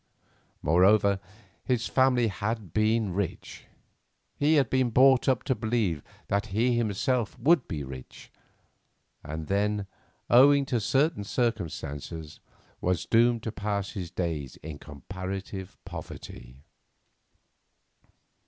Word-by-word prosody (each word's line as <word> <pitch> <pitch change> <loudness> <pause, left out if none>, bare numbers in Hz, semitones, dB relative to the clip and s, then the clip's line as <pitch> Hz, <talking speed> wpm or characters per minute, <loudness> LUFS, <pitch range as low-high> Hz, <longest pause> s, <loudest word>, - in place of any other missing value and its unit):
Moreover, 100 +5 +4 0.4
his 125 -2 0
family 130 -3 +3
had 105 -1 -3
been 110 -2 +1
rich; 100 -1 -4 0.7
he 150 +2 +3
had 140 -3 +4
been 130 -2 +1
brought 130 +2 +5
up 130 -2 +1
to 130 - +1
believe 110 - -1 0.3
that 100 +1 0
he 120 +5 +1
himself 120 +1 0
would 140 +3 +3
be 75 -3 -4
rich, 65 -1 -10 0.9
and 80 +1 -5
then, 100 +2 0 0.4
owing 140 +3 +6
to 125 -3 0
certain 135 +3 +1
circumstances, 80 - -3 0.4
was 90 -3 0
doomed 115 0 +3
to 110 - -3
pass 100 0 -3
his 90 -6 -5
days 80 -7 -3
in 75 -2 -7
comparative 95 +5 -7
poverty. 65 +3 -9
105 Hz, 110 wpm, -28 LUFS, 90-120 Hz, 0.9 s, owing